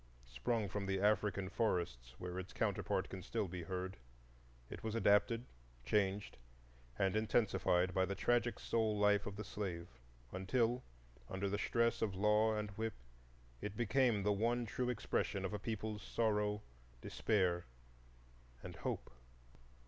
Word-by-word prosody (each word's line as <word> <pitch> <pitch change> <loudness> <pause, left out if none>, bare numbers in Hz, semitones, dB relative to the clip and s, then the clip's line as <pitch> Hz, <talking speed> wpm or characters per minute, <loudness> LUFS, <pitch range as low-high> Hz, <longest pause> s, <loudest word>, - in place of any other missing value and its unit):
Sprung 105 - -1
from 100 0 -3
the 95 0 +1
African 100 -1 +2
forests, 85 - -1
where 90 0 -4
its 95 - -7
counterpart - - 0
can 95 - -6
still 110 +1 -1
be 90 0 -5
heard, 95 +2 -4 0.7
it - - -8
was 110 0 -2
adapted, 115 +2 +4 0.4
changed, 100 - +1 0.6
and 95 +1 +2
intensified 95 -5 +2
by 95 - +3
the 100 - -3
tragic 120 +4 +2
soul 110 -2 +1
life 105 0 +4
of 100 - -4
the 105 - -4
slave, 90 -6 -4 0.4
until, 115 +6 +1 0.5
under 95 +1 -1
the 100 +1 -1
stress 115 +2 +2
of 100 -4 0
law 105 +2 +4
and 105 -1 -3
whip, 110 +2 -3 0.7
it 105 0 -4
became 120 -2 +3
the 105 +1 +3
one 120 +4 +1
true 125 +3 -1
expression 105 -4 -1
of 95 - -3
a 105 - -2
people's 110 -1 -3
sorrow, 105 -1 +1 0.4
despair, 90 -5 +1 1.0
and - - -7
hope. - - -3
105 Hz, 140 wpm, -38 LUFS, 95-110 Hz, 1.0 s, adapted